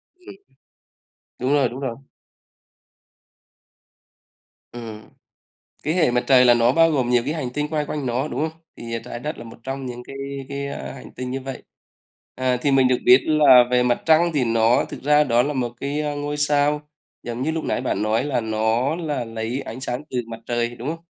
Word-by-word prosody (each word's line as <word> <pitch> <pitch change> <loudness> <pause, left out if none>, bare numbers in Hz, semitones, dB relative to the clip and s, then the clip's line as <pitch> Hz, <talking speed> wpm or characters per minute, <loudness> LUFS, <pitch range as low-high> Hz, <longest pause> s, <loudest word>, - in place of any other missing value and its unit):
Ừm. 365 - -13 1.0
Đúng 130 +3 0
rồi, 140 -3 +3
đúng 125 +3 -8
rồi. 130 -4 -3 2.8
Ừm. 115 -3 -8 0.8
Cái 155 - 0
Hệ 165 -7 +3
Mặt 125 0 +1
Trời 130 -2 +6
là 120 - +7
nó 120 0 +3
bao 165 +4 +4
gồm 130 -5 0
nhiều 120 -1 +3
cái 150 - -1
hành 150 -6 -3
tinh 150 +1 -1
quay 150 -1 -1
quanh 145 -1 -4
nó, 125 +3 -1
đúng - - -5
không? 160 +1 -21 0.2
Thì, 115 0 -7
à, - - -2
Trái - - -6
Đất 150 +5 -5
là - - -8
một 115 - -12
trong 135 +1 -5
những 125 -1 -6
cái 135 - -10 0.3
cái, 140 0 -4
a, 140 - -6
hành 135 - -11
tinh 125 0 -5
như 135 +1 -3
vậy. 135 0 -7 0.7
À, 130 -1 0
thì 140 - +1
mình 135 -1 +5
được 125 -1 +2
biết 125 +1 +7
là 145 -5 +7
về 125 0 +4
Mặt 125 -1 +1
Trăng 165 +2 +4
thì 145 -4 +2
nó 115 0 +3
thực - - -8
ra 150 +1 +5
đó 120 -3 +3
là 145 +2 -2
một 125 -3 -2
cái, 145 +2 -2
ơ, 150 -1 -2
ngôi 145 0 -3
sao 145 0 +2 0.4
giống 120 +1 -5
như 155 +4 0
lúc 160 0 -3
nãy - - -1
bạn 125 -6 -1
nói 110 +1 +1
là 140 -4 -1
nó 110 +5 0
là 150 -7 -3
lấy 115 +3 -4
ánh 115 +4 -7
sáng 125 +1 -3
từ 125 - -3
Mặt 115 -1 -8
Trời, 120 0 -1
đúng 120 +3 -7
không? 165 +1 -4
130 Hz, 215 wpm, -22 LUFS, 120-145 Hz, 2.8 s, là